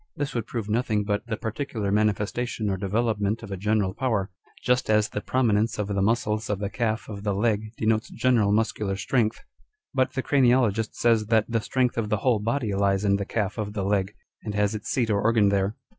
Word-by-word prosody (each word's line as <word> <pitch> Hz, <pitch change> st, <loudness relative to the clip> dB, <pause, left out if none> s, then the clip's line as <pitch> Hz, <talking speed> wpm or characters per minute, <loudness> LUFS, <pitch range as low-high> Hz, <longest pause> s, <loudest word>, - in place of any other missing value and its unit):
This 145 Hz, 0 st, -3 dB
would 115 Hz, -2 st, -3 dB
prove 115 Hz, -4 st, -4 dB
nothing 110 Hz, -1 st, 0 dB
but 105 Hz, +2 st, -2 dB
the 110 Hz, -3 st, -2 dB
particular 110 Hz, -3 st, -3 dB
manifestation 105 Hz, +1 st, 0 dB
or -, -, 0 dB
development 105 Hz, +2 st, -1 dB
of 105 Hz, -, -8 dB
a -, -, -2 dB
general 100 Hz, 0 st, 0 dB
power; 110 Hz, -5 st, -1 dB, 0.3 s
just 125 Hz, -1 st, +1 dB
as 105 Hz, 0 st, +4 dB
the 105 Hz, -, -4 dB
prominence 115 Hz, -3 st, +1 dB
of 105 Hz, -1 st, -2 dB
the 100 Hz, -1 st, 0 dB
muscles 110 Hz, +1 st, 0 dB
of 105 Hz, -, 0 dB
the 100 Hz, 0 st, -4 dB
calf 110 Hz, +1 st, -1 dB
of 100 Hz, -2 st, -7 dB
the 100 Hz, -1 st, -1 dB
leg 110 Hz, 0 st, 0 dB
denotes 110 Hz, 0 st, +1 dB
general 115 Hz, -4 st, +2 dB
muscular 105 Hz, -2 st, 0 dB
strength. 110 Hz, +3 st, 0 dB, 0.5 s
But 130 Hz, -1 st, +1 dB
the 130 Hz, -1 st, -2 dB
craniologist 120 Hz, -5 st, +2 dB
says 115 Hz, -3 st, +2 dB
that 110 Hz, -1 st, +3 dB
the 115 Hz, -1 st, 0 dB
strength 125 Hz, 0 st, 0 dB
of 105 Hz, -2 st, -2 dB
the 105 Hz, -, +1 dB
whole 120 Hz, 0 st, +2 dB
body 115 Hz, 0 st, -1 dB
lies 100 Hz, 0 st, +1 dB
in 100 Hz, 0 st, +3 dB
the 100 Hz, -, -3 dB
calf 105 Hz, 0 st, -2 dB
of 105 Hz, -1 st, -3 dB
the 100 Hz, -2 st, -2 dB
leg, 100 Hz, 0 st, 0 dB, 0.3 s
and 105 Hz, -2 st, -5 dB
has 105 Hz, 0 st, +1 dB
its 105 Hz, -1 st, -5 dB
seat 120 Hz, -4 st, +1 dB
or 100 Hz, -1 st, +1 dB
organ 110 Hz, -2 st, +3 dB
there. 100 Hz, +1 st, 0 dB
110 Hz, 210 wpm, -25 LUFS, 100-115 Hz, 0.5 s, as